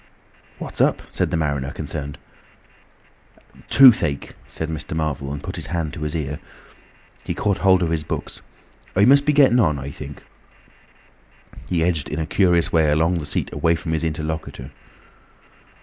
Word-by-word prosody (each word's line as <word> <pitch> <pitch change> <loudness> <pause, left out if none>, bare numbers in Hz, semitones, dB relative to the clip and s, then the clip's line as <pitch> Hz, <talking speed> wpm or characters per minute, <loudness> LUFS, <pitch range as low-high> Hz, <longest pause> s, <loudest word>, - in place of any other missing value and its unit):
"What's - - -4
up?" - - +2
said - - -1
the 85 - -1
mariner, 70 -4 -1
concerned. 70 -2 -5 1.5
"Toothache," 100 - +5
said 80 - -4
Mr. 80 0 -5
Marvel, 70 -3 -2
and 70 0 -6
put - - -6
his - - -4
hand 80 -2 -3
to 75 - -8
his 75 +1 -3
ear. 75 -2 -3 0.8
He - - -3
caught 100 -2 0
hold 95 -2 +4
of 80 - -1
his 80 -2 -1
books. - - -5 0.5
"I 100 +2 +5
must 140 +3 +5
be 150 - +4
getting 135 -4 +5
on, 80 -9 +2
I 70 +1 -6
think," - - -9 1.3
he - - -19
said. - - -14
He 85 -3 +1
edged 80 -5 0
in 75 - -4
a 80 - -1
curious 85 -1 +2
way 80 -2 +4
along 80 +4 +2
the 75 - -6
seat - - -2
away 85 0 +2
from 80 0 -4
his 80 0 -1
interlocutor. 80 -4 -4
80 Hz, 170 wpm, -22 LUFS, 75-90 Hz, 1.5 s, Toothache